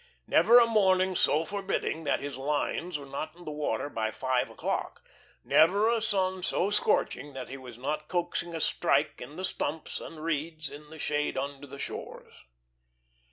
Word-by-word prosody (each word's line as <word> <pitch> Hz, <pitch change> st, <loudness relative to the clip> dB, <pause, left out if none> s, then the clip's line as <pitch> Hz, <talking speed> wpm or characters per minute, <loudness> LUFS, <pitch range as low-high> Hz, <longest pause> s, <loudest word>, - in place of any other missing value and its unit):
Never 235 Hz, -, +6 dB
a 240 Hz, -, +8 dB
morning 190 Hz, -4 st, +3 dB
so 155 Hz, -2 st, +3 dB
forbidding 195 Hz, -5 st, -2 dB
that -, -, +1 dB
his 145 Hz, 0 st, -4 dB
lines 150 Hz, +5 st, -1 dB
were 140 Hz, -, -9 dB
not 155 Hz, +3 st, -5 dB
in 175 Hz, 0 st, -14 dB
the 155 Hz, -, -4 dB
water 145 Hz, -5 st, -1 dB
by 110 Hz, -6 st, -1 dB
five 130 Hz, +2 st, 0 dB
o'clock; -, -, -3 dB, 0.4 s
never 200 Hz, +7 st, +5 dB
a 230 Hz, -1 st, +1 dB
sun 190 Hz, -3 st, 0 dB
so 190 Hz, +2 st, 0 dB
scorching 145 Hz, -9 st, +1 dB
that 130 Hz, -2 st, -6 dB
he 135 Hz, -, -6 dB
was 125 Hz, -3 st, -10 dB
not 150 Hz, +4 st, -3 dB
coaxing 175 Hz, -1 st, -2 dB
a 160 Hz, -, -3 dB
"strike" -, -, +1 dB
in 150 Hz, -, -8 dB
the 185 Hz, +2 st, -2 dB
stumps 155 Hz, -2 st, -3 dB
and 160 Hz, -, -9 dB
reeds 155 Hz, -1 st, -2 dB
in 150 Hz, +1 st, -11 dB
the 160 Hz, -, -10 dB
shade 150 Hz, -2 st, -1 dB
under 140 Hz, +1 st, -4 dB
the 140 Hz, +1 st, -9 dB
shores. -, -, -7 dB
155 Hz, 175 wpm, -29 LUFS, 140-185 Hz, 0.4 s, a